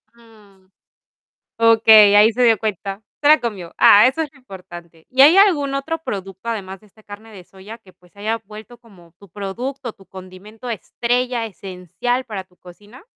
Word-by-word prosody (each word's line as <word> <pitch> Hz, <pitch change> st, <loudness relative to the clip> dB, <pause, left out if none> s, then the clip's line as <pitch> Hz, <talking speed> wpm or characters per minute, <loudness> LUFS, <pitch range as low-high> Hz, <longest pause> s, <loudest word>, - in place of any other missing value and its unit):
Mm, 210 Hz, -5 st, -23 dB, 0.9 s
okey, 220 Hz, -2 st, +6 dB
ahí 210 Hz, +2 st, +5 dB
se 250 Hz, +2 st, -2 dB
dio 225 Hz, -3 st, +3 dB
cuenta. 200 Hz, -1 st, -5 dB, 0.2 s
Se 290 Hz, -, +1 dB
la 305 Hz, +1 st, +6 dB
comió. 195 Hz, -8 st, -6 dB
Ah, 205 Hz, +3 st, +6 dB
eso 270 Hz, +5 st, -1 dB
es 305 Hz, -, -7 dB
lo 285 Hz, -, -22 dB
importante, 175 Hz, -8 st, -14 dB
¿y 260 Hz, +1 st, +4 dB
hay 310 Hz, +6 st, +6 dB
algún 310 Hz, -9 st, +3 dB
otro 315 Hz, +4 st, -4 dB
producto 195 Hz, -, -7 dB
además 195 Hz, -4 st, -6 dB
de 215 Hz, -, -22 dB
esta 215 Hz, +2 st, -24 dB
carne 215 Hz, +2 st, -13 dB
de 190 Hz, -3 st, -12 dB
soya 195 Hz, +5 st, -13 dB
que, 195 Hz, -5 st, -21 dB
pues, 180 Hz, -1 st, -27 dB
se 200 Hz, -, -18 dB
haya 220 Hz, +2 st, -2 dB
vuelto 215 Hz, +3 st, -13 dB
como 190 Hz, -8 st, -21 dB
tu 200 Hz, -1 st, -18 dB
producto, 230 Hz, +6 st, -7 dB
tu 195 Hz, -, -22 dB
condimento 190 Hz, +6 st, -12 dB
estrella, 240 Hz, +2 st, -3 dB
esencial 195 Hz, +6 st, -5 dB
para 200 Hz, -5 st, -7 dB
tu 180 Hz, -1 st, -32 dB
cocina? 205 Hz, -, -17 dB
215 Hz, 180 wpm, -19 LUFS, 190-240 Hz, 0.9 s, okey